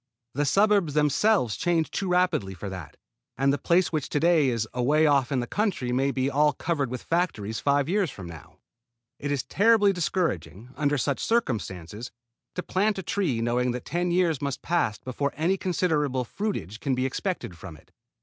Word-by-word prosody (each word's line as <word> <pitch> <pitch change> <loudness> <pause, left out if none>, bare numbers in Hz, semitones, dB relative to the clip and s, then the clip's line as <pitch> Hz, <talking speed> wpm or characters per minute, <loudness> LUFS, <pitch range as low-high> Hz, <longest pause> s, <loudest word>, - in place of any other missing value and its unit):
The 145 +3 0
suburbs 195 -2 +3
themselves 150 - +2
change 165 +6 0
too 195 - -2
rapidly 180 - +1
for 100 +2 -6
that; 90 -6 -8 0.4
and 135 +1 +3
the 145 - -1
place 175 +2 +2
which 155 -4 -2
today 155 -2 +3
is 115 -3 -1
away 145 +6 +3
off 140 -4 +3
in 130 -3 +1
the - - -3
country 185 - -1
may 135 +2 +1
be 130 -1 0
all 150 +1 +3
covered 145 -4 -1
with 125 0 -5
factories 110 - -1
five 140 0 +2
years 195 0 +1
from 95 -7 -9
now. 85 -4 -11 0.6
It 145 0 -3
is 140 -2 0
terribly 205 -1 +4
discouraging, 140 - -2
under 145 0 +1
such 140 +1 -1
circumstances, 110 - -2 0.5
to 180 - -3
plant 205 +2 +1
a 190 - -4
tree 165 - -1
knowing 120 +1 +1
that 125 - -6
ten 175 +1 -1
years 170 -5 +1
must 140 -2 -3
pass 160 -11 0
before 135 +4 -3
any 165 +6 +1
considerable 155 -8 0
fruitage 115 - -4
can 135 +2 0
be 130 +1 0
expected 135 - -3
from 85 -3 -10
it. - - -23
145 Hz, 180 wpm, -26 LUFS, 125-175 Hz, 0.6 s, terribly